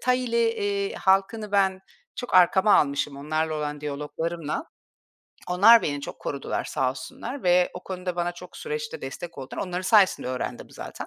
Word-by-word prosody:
Thai'li, 250 -2 +1
eee, 200 -3 -2
halkını 195 +2 +1
ben 190 -2 +2 0.4
çok 245 - -5
arkama 190 +3 +6
almışım 140 0 +1
onlarla 155 +2 -1
olan 150 -1 -3
diyaloglarımla. 150 - -4 0.8
Onlar 210 +6 +7
beni 145 -1 -2
çok - - -7
korudular 140 - -3
sağ 130 - 0
olsunlar 140 - -7
ve 180 0 +4
o 180 - -8
konuda 180 -1 -4
bana 175 0 -1
çok 180 0 -12
süreçte 460 0 -5
destek 170 -1 -7
oldular. 135 0 -6
Onların 180 -1 -3
sayesinde 195 - +4
öğrendim 130 0 -4
zaten. - - -8
180 Hz, 150 wpm, -25 LUFS, 150-205 Hz, 0.8 s, Onlar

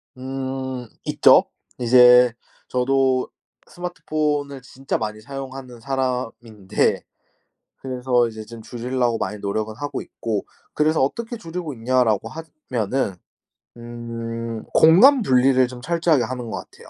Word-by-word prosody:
음 130 -1 -5 0.2
있죠. - - +6 0.4
이제 125 0 +6 0.4
저도 130 0 +1 0.4
스마트폰을 150 -6 -3
진짜 135 +2 -4
많이 110 -1 -5
사용하는 135 -1 -8
사람인데 120 -6 -2 0.7
그래서 125 -2 0
이제 110 -1 -8
좀 115 0 -11
줄이려고 120 0 -1
많이 105 +1 -4
노력을 110 +2 -3
하고 145 +3 -4
있고 110 -3 -4 0.3
그래서 155 0 +2
'어떻게 230 - -2
줄이고 165 -6 -6
있냐.'라고 115 -3 +1
하지 160 +5 -10 0.2
면은 115 -3 -1 0.6
음 115 -1 -6
공간 240 - +7
분리를 130 - +4
좀 125 0 -10
철저하게 165 -3 +2
하는 125 -1 -5
것 - - -4
같아요. - - -16
125 Hz, 275 characters per minute, -22 LUFS, 115-135 Hz, 0.7 s, 공간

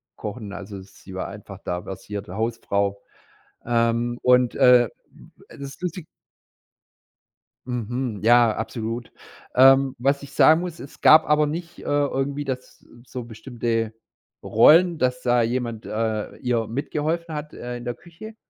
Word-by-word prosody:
kochen, 105 -1 -7
also, 100 0 -8
sie 95 0 -14
war 95 - -3
einfach 100 0 -10
da 90 0 -3
versierte 100 +1 -7
Hausfrau. 100 -3 -1 0.6
Ähm, 120 0 0
und, 125 -1 +3
äh, 125 -2 +6 0.2
d - - -18 0.3
das - - -10
ist - - -15
lustig 180 -2 -4 1.6
Mhm, 120 -2 -3
ja, 120 -1 +5
absolut. 115 +1 -5 0.4
Ähm, 135 +1 +6
was 140 +3 +1
ich 140 -1 -11
sagen 160 +4 +6
muss, 175 -2 -6
es 135 - -11
gab 155 +1 +7
aber 150 0 +4
nicht, 170 +3 -6
äh, - - -11
irgendwie 140 0 -1
das 130 -2 -7 0.2
so 125 -2 -7
bestimmte 115 -1 -3 0.5
Rollen, 165 +9 +5
dass 125 -1 0
da 120 -1 +2
jemand, 115 -2 -3
äh, 110 -1 -2
ihr 120 -3 -1
mitgeholfen 155 +6 -3
hat, 150 0 -6
äh, 120 0 -6
in 120 - -10
der 120 - -2
Küche. 175 - -12
120 Hz, 145 wpm, -23 LUFS, 110-140 Hz, 1.6 s, gab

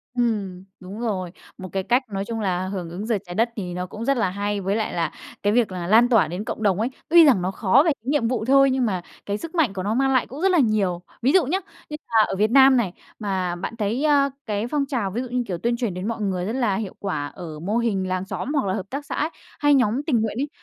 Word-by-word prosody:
Ừm, 205 -7 -1 0.2
đúng 190 +4 -9
rồi. 190 -7 -2 0.3
Một 185 -1 -8
cái 190 - -1
cách, 245 +7 +2
nói 195 0 -3
chung 225 0 -4
là, 185 -2 -1
hưởng 185 -4 -4
ứng 185 +5 -6
Giờ 225 -3 +1
Trái 175 0 -8
Đất 230 +4 +2
thì 180 -4 -4
nó 180 0 -3
cũng 215 +5 -7
rất 275 0 +2
là 195 -5 +1
hay, 205 +1 -2
với 195 +2 0
lại 220 -1 -2
là, 165 -1 -1 0.3
cái 205 +1 +2
việc 230 -5 +2
là 175 -2 -4
lan 230 +4 +5
tỏa 220 -9 +4
đến 180 +6 -4
cộng 220 - -5
đồng 200 -1 +2
ấy, 230 - 0 0.2
tuy 335 0 +8
rằng 255 -11 +5
nó 185 +2 -1
khó 195 +7 +4
về 330 - +4
cái 260 - -4
nhiệm 285 -6 +2
vụ 230 -2 -1
thôi, 275 0 +5
nhưng 260 -1 +1
mà 185 -5 -1 0.2
cái 205 +1 -2
sức 330 +6 -8
mạnh 290 - +2
của 185 - -4
nó 210 +3 0
mang 270 +2 +2
lại 255 - +2
cũng 275 +5 -8
rất 385 0 +3
là 350 - +4
nhiều. 200 -7 +1 0.2
Ví 260 +4 +3
dụ 360 -6 +4
nhá, 365 +8 0 0.3
như 300 - -5
là 220 -2 +4
ở - - -3
Việt 215 +3 +1
Nam 265 0 +7
này, 195 -7 0 0.3
mà 190 -4 -1
bạn 180 +6 -5
thấy, 225 +5 -1
a, 285 -2 +4 0.2
cái 210 +1 -2
phong 285 +1 0
trào 240 -9 -2
ví 235 +6 -2
dụ 255 - -5
như, 250 0 -1
kiểu, 180 -3 -3
tuyên 235 +6 0
truyền 235 -7 -2
đến 185 +4 -4
mọi 225 -2 -3
người 185 -3 -1
rất 220 - -2
là 240 -6 +1
hiệu 205 -2 -4
quả 155 -8 -2
ở 155 -1 -9
mô 205 +7 -1
hình 200 -6 0
làng 185 0 -2
xóm 235 +8 -4
hoặc 280 -8 +1
là 190 - 0
hợp 195 +1 -4
tác 285 +2 -5
xã - - -5
ấy, 305 - 0 0.3
hay 290 -1 +4
nhóm 250 0 +2
tình 250 -7 +1
nguyện 220 0 -2
ấy, 290 - -2
215 Hz, 290 wpm, -23 LUFS, 190-255 Hz, 0.3 s, tuy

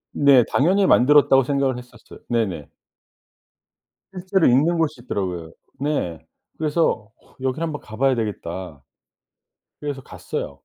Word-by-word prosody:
네 140 -4 +6
당연히 190 +7 +2
만들었다고 135 0 +5
생각을 135 -1 0
했었어요. 125 -2 -13
네네. 95 - -1 1.4
실제로 185 -1 +1
있는 150 +8 +3
곳이 155 -6 -1
있더라고요. 90 -8 -4 0.3
네. 140 - -2 0.4
그래서 150 -9 0 0.3
'여기를 130 +4 -2
한번 155 -3 -4
가봐야 130 +4 0
되겠다.' 90 - -5 1.0
그래서 145 -2 -5
갔어요. - - -6
130 Hz, 285 characters per minute, -22 LUFS, 110-150 Hz, 1.4 s, 네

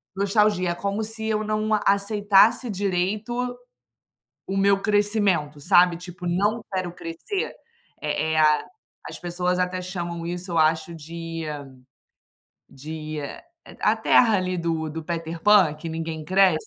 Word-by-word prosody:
nostalgia, 200 -2 +2
como 200 +4 -2
se 220 0 -6
eu 215 -1 0
não 215 0 -1 0.2
aceitasse 205 +4 +3
direito 200 +3 -1 1.1
o 195 - -2
meu 195 0 +3
crescimento, 205 -8 +1
sabe? 175 +2 +5
Tipo, 180 0 -9
não 205 +6 0
quero 185 -2 -2
crescer. 175 - -4 0.5
Eh 160 - -1
eh, - - +1
A 150 -1 +4 0.4
as - - -7
pessoas 180 +1 -1
até 180 0 -1
chamam 175 -2 -5
isso 180 +1 -4
eu 170 - 0
acho 160 +2 +2
de 165 +1 -6 1.2
de 155 +2 -7 0.6
a - - +3
terra 225 -4 +4
ali 185 0 -2
do 165 -2 -1
do 160 +1 -6
Peter 165 0 -4
Pan, 200 -7 +5
que 165 +2 -7
ninguém 160 -1 -4
cresce. 185 -2 +3
180 Hz, 135 wpm, -24 LUFS, 165-205 Hz, 1.2 s, sabe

